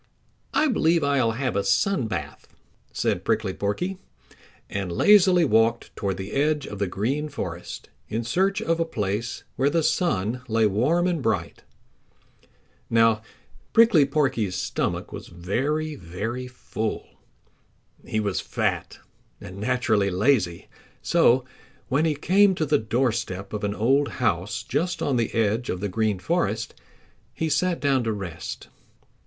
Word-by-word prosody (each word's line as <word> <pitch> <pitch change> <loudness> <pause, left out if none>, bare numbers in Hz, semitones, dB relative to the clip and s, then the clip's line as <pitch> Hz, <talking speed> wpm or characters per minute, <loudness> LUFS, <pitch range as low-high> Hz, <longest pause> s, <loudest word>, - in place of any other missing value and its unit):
"I 310 - +3
believe 170 - +2
I'll 135 -5 +2
have 130 -1 -2
a 100 - +1
sun 140 - +1
bath," 75 -8 -5 0.4
said - - -1
Prickly 110 -4 0
Porky, 175 - -2 0.7
and 95 -3 -3
lazily 185 - +5
walked 115 -1 +2
toward 95 -2 -2
the 95 +2 -6
edge 150 0 +1
of 105 - -7
the 100 - 0
Green 135 +12 -2
Forest 90 - -6 0.2
in 115 +3 -2
search 195 - +1
of 165 -5 0
a - - +3
place 105 -6 -3
where 135 +2 +3
the 165 +2 +1
sun 125 - 0
lay 115 -1 +2
warm 130 - +2
and 175 -4 0
bright. 105 -8 -1 1.3
Now 115 -1 +4 0.5
Prickly 225 -11 +6
Porky's 130 -10 0
stomach 90 - -2
was - - -7
very, 135 - -2
very 110 - -5
full. 110 -3 -4 1.0
He 110 - -2
was 100 -3 -1
fat - - -2 0.4
and 95 +2 -9
naturally 105 -2 +1
lazy, 95 -3 +1 0.4
so 125 +1 +4 0.4
when 140 +4 +2
he 155 -2 +1
came 190 +6 +4
to 160 - 0
the 145 0 +2
doorstep 110 -4 -1
of 105 - -4
an 100 0 -1
old 135 +6 +2
house 105 -4 -1
just 165 +7 -1
on 135 -3 +1
the 115 -2 0
edge 115 +2 +1
of 90 - -2
the 100 +2 -2
Green 110 +1 0
Forest 90 - -1 0.6
he 160 - -1
sat 180 +2 +1
down 135 -3 +2
to 110 - 0
rest. 95 -6 -6
115 Hz, 145 wpm, -25 LUFS, 100-150 Hz, 1.3 s, Prickly